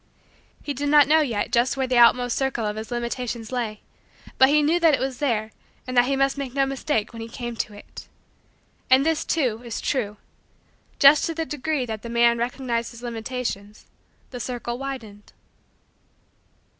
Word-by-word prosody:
He 290 Hz, -, -3 dB
did 285 Hz, +2 st, -2 dB
not 295 Hz, -1 st, +6 dB
know 315 Hz, +2 st, +5 dB
yet 230 Hz, -6 st, -2 dB
just 245 Hz, +2 st, +2 dB
where 265 Hz, -, +1 dB
the 250 Hz, -1 st, +2 dB
outmost 245 Hz, +1 st, +5 dB
circle 265 Hz, -4 st, -1 dB
of 210 Hz, 0 st, -2 dB
his 220 Hz, +1 st, -6 dB
limitations 240 Hz, -1 st, -4 dB
lay 230 Hz, -4 st, -3 dB, 0.6 s
but 265 Hz, -, +7 dB
he 300 Hz, +1 st, +4 dB
knew 325 Hz, +4 st, +2 dB
that 325 Hz, -4 st, +5 dB
it -, -, -6 dB
was 265 Hz, -1 st, -3 dB
there 220 Hz, -6 st, -1 dB, 0.3 s
and 255 Hz, -, -5 dB
that 245 Hz, 0 st, +5 dB
he 275 Hz, +2 st, 0 dB
must 275 Hz, +1 st, +1 dB
make 265 Hz, -2 st, -5 dB
no 275 Hz, -1 st, +3 dB
mistake 270 Hz, -5 st, -2 dB
when 230 Hz, -, -8 dB
he 225 Hz, -, -6 dB
came 240 Hz, 0 st, -6 dB
to 210 Hz, -, -3 dB
it. 205 Hz, -, -12 dB, 0.8 s
And 265 Hz, +2 st, +5 dB
this, 320 Hz, -1 st, +1 dB
too, 250 Hz, -8 st, 0 dB
is 235 Hz, -2 st, -5 dB
true: 215 Hz, -7 st, -2 dB, 0.8 s
just 285 Hz, +2 st, +6 dB
to 330 Hz, -, -4 dB
the 325 Hz, 0 st, -2 dB
degree 295 Hz, -2 st, -2 dB
that 220 Hz, -2 st, -5 dB
the 235 Hz, -, -8 dB
man 235 Hz, 0 st, +3 dB
recognized 235 Hz, -1 st, -2 dB
his 235 Hz, 0 st, -13 dB
limitations, 230 Hz, -3 st, -5 dB, 0.5 s
the 250 Hz, -, -6 dB
circle 240 Hz, 0 st, -4 dB
widened. 230 Hz, -7 st, -8 dB
245 Hz, 180 wpm, -24 LUFS, 230-275 Hz, 0.8 s, but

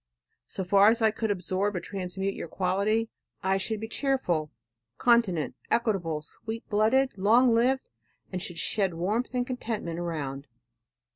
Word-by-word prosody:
So 190 Hz, -, -4 dB
far 200 Hz, +3 st, +6 dB
as 230 Hz, +1 st, +2 dB
I 220 Hz, -, +5 dB
could 220 Hz, 0 st, -2 dB
absorb 195 Hz, +1 st, -1 dB
or -, -, 0 dB
transmute 190 Hz, +1 st, -4 dB
your -, -, -6 dB
quality 200 Hz, +6 st, 0 dB, 0.3 s
I 190 Hz, +1 st, +2 dB
should 215 Hz, +3 st, -1 dB
be 220 Hz, -, -5 dB
cheerful, 225 Hz, -, 0 dB, 0.5 s
continent, 230 Hz, -10 st, +3 dB, 0.2 s
equitable, 175 Hz, -10 st, 0 dB
sweet 220 Hz, +8 st, -7 dB
blooded, 220 Hz, +3 st, +2 dB
long 235 Hz, +5 st, +5 dB
lived, 255 Hz, +3 st, +2 dB, 0.4 s
and 185 Hz, -1 st, -3 dB
should 175 Hz, -2 st, -5 dB
shed 195 Hz, -3 st, 0 dB
warmth 215 Hz, +9 st, -1 dB
and 245 Hz, 0 st, +1 dB
contentment 225 Hz, -9 st, -4 dB
around. 145 Hz, -5 st, -4 dB
200 Hz, 145 wpm, -28 LUFS, 180-230 Hz, 0.5 s, far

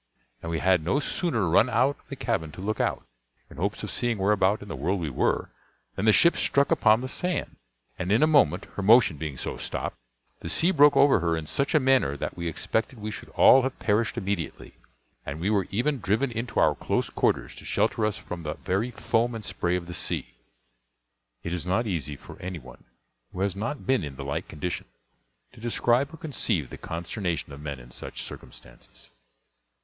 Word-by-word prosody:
and 85 Hz, -, -5 dB
we 85 Hz, -, -1 dB
had 90 Hz, -1 st, +3 dB
no 90 Hz, -, +1 dB
sooner 140 Hz, -, -1 dB
run 105 Hz, +9 st, +4 dB
out 135 Hz, +3 st, +2 dB
of -, -, -29 dB
the 140 Hz, -, -5 dB
cabin 110 Hz, -, -2 dB
to -, -, -12 dB
look 105 Hz, +4 st, -2 dB
out, -, -, -1 dB, 0.5 s
in -, -, -12 dB
hopes -, -, -2 dB
of -, -, -4 dB
seeing 120 Hz, -2 st, -1 dB
whereabout 100 Hz, +1 st, +2 dB
in -, -, -11 dB
the 95 Hz, -, -5 dB
world 90 Hz, +9 st, -1 dB
we 80 Hz, -4 st, -3 dB
were, -, -, 0 dB, 0.4 s
than 100 Hz, -, -2 dB
the 110 Hz, -, +7 dB
ship 170 Hz, +10 st, +6 dB
struck 140 Hz, 0 st, +2 dB
upon 110 Hz, +1 st, +4 dB
the 130 Hz, -, -3 dB
sand, 180 Hz, +6 st, -3 dB, 0.4 s
and 95 Hz, +1 st, -2 dB
in 110 Hz, +7 st, +4 dB
a -, -, +8 dB
moment, 140 Hz, -, +3 dB
her -, -, -4 dB
motion 110 Hz, -3 st, +6 dB
being 70 Hz, -2 st, -5 dB
so -, -, -4 dB
stopped, -, -, -4 dB, 0.4 s
the -, -, -6 dB
sea 175 Hz, +3 st, +2 dB
broke 145 Hz, -4 st, +6 dB
over 135 Hz, -5 st, +6 dB
her 85 Hz, -1 st, 0 dB
in 80 Hz, -, -5 dB
such 140 Hz, -, -1 dB
a -, -, +7 dB
manner 130 Hz, -, +2 dB
that -, -, -4 dB
we 85 Hz, -1 st, -4 dB
expected 110 Hz, -, -2 dB
we 105 Hz, +1 st, -4 dB
should -, -, -8 dB
all 135 Hz, -, +8 dB
have 130 Hz, 0 st, -3 dB
perished 110 Hz, +2 st, 0 dB
immediately; 95 Hz, -7 st, -3 dB, 0.5 s
and 70 Hz, +2 st, -6 dB
we 95 Hz, +5 st, 0 dB
were 100 Hz, -3 st, +1 dB
even 125 Hz, +7 st, 0 dB
driven 110 Hz, +6 st, 0 dB
into 115 Hz, +1 st, -2 dB
our -, -, +5 dB
close -, -, -2 dB
quarters, -, -, 0 dB
to -, -, -11 dB
shelter 110 Hz, -, 0 dB
us 105 Hz, 0 st, 0 dB
from 90 Hz, -5 st, -7 dB
the 75 Hz, -2 st, -4 dB
very 100 Hz, +6 st, -1 dB
foam 115 Hz, 0 st, 0 dB
and 110 Hz, -, -6 dB
spray 85 Hz, +1 st, -1 dB
of 90 Hz, -1 st, -3 dB
the 90 Hz, -, -7 dB
sea. -, -, -4 dB, 1.1 s
It 85 Hz, -, -3 dB
is 90 Hz, 0 st, -3 dB
not 95 Hz, +6 st, +1 dB
easy 80 Hz, -8 st, -3 dB
for -, -, -13 dB
any 90 Hz, -1 st, -4 dB
one 65 Hz, -4 st, -14 dB, 0.5 s
who 90 Hz, -, -6 dB
has 100 Hz, -1 st, 0 dB
not 115 Hz, +8 st, -4 dB
been 130 Hz, -7 st, +2 dB
in 70 Hz, -3 st, -6 dB
the 70 Hz, 0 st, -7 dB
like 70 Hz, -, -3 dB
condition 85 Hz, 0 st, -4 dB, 0.7 s
to 120 Hz, -, -15 dB
describe 120 Hz, +4 st, +1 dB
or 160 Hz, -, -10 dB
conceive 110 Hz, -, -2 dB
the -, -, -7 dB
consternation 85 Hz, -2 st, -4 dB
of 70 Hz, -, -10 dB
men 70 Hz, -3 st, -5 dB
in -, -, -14 dB
such -, -, -7 dB
circumstances. -, -, -13 dB
100 Hz, 210 wpm, -26 LUFS, 85-120 Hz, 1.1 s, a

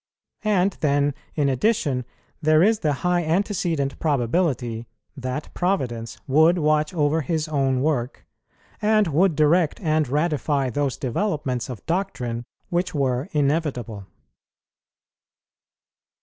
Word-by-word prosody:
And 200 Hz, -3 st, +2 dB
then, 145 Hz, -1 st, +2 dB, 0.2 s
in 145 Hz, -3 st, +2 dB
addition, 140 Hz, -, +1 dB, 0.4 s
there 155 Hz, +1 st, +4 dB
is 215 Hz, +2 st, +3 dB
the 150 Hz, -, +1 dB
high 175 Hz, -1 st, +2 dB
antecedent 165 Hz, -5 st, -1 dB
probability 125 Hz, -5 st, 0 dB, 0.3 s
that 130 Hz, +2 st, -5 dB
Providence 120 Hz, -, -2 dB
would 160 Hz, +6 st, +4 dB
watch 155 Hz, -1 st, +2 dB
over 155 Hz, -2 st, +1 dB
His 155 Hz, +2 st, -1 dB
own 135 Hz, -4 st, +1 dB
work, 135 Hz, -5 st, -1 dB, 0.6 s
and 215 Hz, 0 st, +3 dB
would 165 Hz, +3 st, +3 dB
direct 155 Hz, +2 st, +3 dB
and 155 Hz, -4 st, +1 dB
ratify 145 Hz, -2 st, 0 dB
those 140 Hz, -1 st, -1 dB
developments 130 Hz, -, -2 dB
of 120 Hz, -6 st, -8 dB
doctrine 125 Hz, -10 st, -2 dB, 0.2 s
which 175 Hz, 0 st, -1 dB
were 130 Hz, -1 st, 0 dB
inevitable. 140 Hz, -, -1 dB
150 Hz, 110 wpm, -23 LUFS, 130-170 Hz, 0.6 s, there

